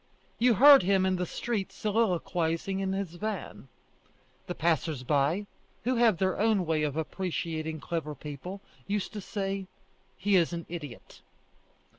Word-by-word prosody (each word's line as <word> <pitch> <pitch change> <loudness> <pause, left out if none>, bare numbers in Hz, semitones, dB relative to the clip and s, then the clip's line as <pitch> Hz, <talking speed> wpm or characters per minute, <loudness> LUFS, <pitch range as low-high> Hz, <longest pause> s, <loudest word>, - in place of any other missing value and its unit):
You 240 0 +4
heard 280 +6 +9
him 190 +1 +2
in 185 -1 +1
the 180 0 -2
street 220 -1 -3
soliloquizing 190 -4 0
in 190 -1 -1
his 195 -3 -3
van. 215 +2 -5 0.8
The 180 - -4
passers 160 -4 0
by, 145 +8 +1 0.4
who 255 +1 +1
have 230 -6 +4
their 190 +1 0
own 210 -3 +2
way 160 -1 +1
of 150 -1 -1
appreciating 160 -2 -3
clever 155 -3 -3
people, 150 +8 -7 0.3
used 205 +1 -2
to 210 - -5
say: 195 -1 -3 0.5
He 200 0 +3
is 175 -1 +2
an 170 -1 -4
idiot. 150 -8 -8
185 Hz, 145 wpm, -29 LUFS, 160-200 Hz, 0.8 s, heard